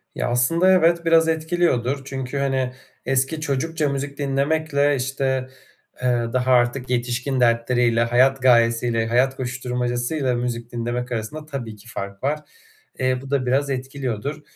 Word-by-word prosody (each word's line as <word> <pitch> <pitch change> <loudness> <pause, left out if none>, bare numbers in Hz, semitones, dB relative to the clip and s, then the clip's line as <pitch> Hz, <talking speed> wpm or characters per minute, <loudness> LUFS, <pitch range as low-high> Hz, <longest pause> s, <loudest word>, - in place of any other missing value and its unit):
Ya, - - -1
aslında 165 +10 +3
evet, 170 -1 +3
biraz 165 -1 +5
etkiliyordur. 160 -5 0
Çünkü, 135 0 -5
hani, 135 -2 0 0.3
eski 135 +4 0
çocukça 150 +2 -1
müzik 140 +1 -4
dinlemekle, 145 +1 +1
işte, 130 0 -1 0.5
eee, 120 -2 0
daha 130 0 +1
artık 125 +1 +2
yetişkin 125 +2 -1
dertleriyle, 115 0 +2
hayat 130 +3 +3
gayesiyle, 115 -2 +3
hayat 125 +3 +2
koşuşturmacasıyla 125 +2 -2
müzik 120 -1 -3
dinlemek 120 +1 -3
arasında 120 +7 -4
tabii 130 -7 -6
ki 105 +2 -17
fark 100 -1 -7
var. 145 +3 0 0.6
Eee, 130 0 +1
bu 135 - -10
da 140 -2 0
biraz 135 +3 +1
etkiliyordur. 135 +1 -4
130 Hz, 135 wpm, -22 LUFS, 120-140 Hz, 0.6 s, biraz